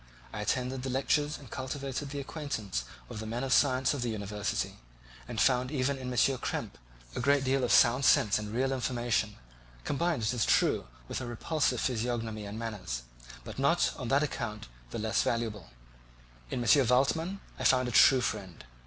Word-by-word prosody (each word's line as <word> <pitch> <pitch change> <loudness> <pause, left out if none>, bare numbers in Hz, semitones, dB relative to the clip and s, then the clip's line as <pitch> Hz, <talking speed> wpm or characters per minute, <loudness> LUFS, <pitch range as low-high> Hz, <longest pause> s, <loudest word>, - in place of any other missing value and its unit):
I 105 - -4
attended 125 +4 -1
the 130 - -4
lectures 145 +3 +1
and 135 -6 -14
cultivated 135 +1 -4
the 140 +1 -4
acquaintance 110 - -4 0.2
of 105 - -7
the 110 - -5
men 120 +3 -3
of 130 -2 +1
science 130 0 +3
of 140 - -3
the 120 - -1
university, 105 -1 -3 0.5
and - - -6
I - - +2
found 125 -1 +2
even 140 -1 0
in 125 -1 -5
M. 125 - -4 0.2
Krempe - - -4 0.4
a - - -2
great 140 +2 +3
deal 135 0 +1
of 125 - +1
sound 125 +2 +5
sense 125 -6 +4
and 105 0 -6
real 130 +4 0
information, 120 -4 -1 0.5
combined, 160 - 0
it 110 +3 +1
is 120 -3 +1
true, - - +2 0.2
with - - -4
a 125 - -5
repulsive 140 +6 0
physiognomy 115 -3 -2
and 105 +2 -6
manners, 105 - -4 0.4
but - - -8
not 140 +6 +3
on 130 - -5
that 140 +4 +3
account 115 - -4 0.2
the - - -5
less 110 0 +1
valuable. 110 -6 -2 0.8
In 120 - -2
M. 135 +1 +5
Waldman 160 - +2 0.2
I - - -3
found 130 -1 +4
a - - -3
true 130 +3 +7
friend. 95 -8 -4
125 Hz, 185 wpm, -30 LUFS, 110-135 Hz, 0.8 s, true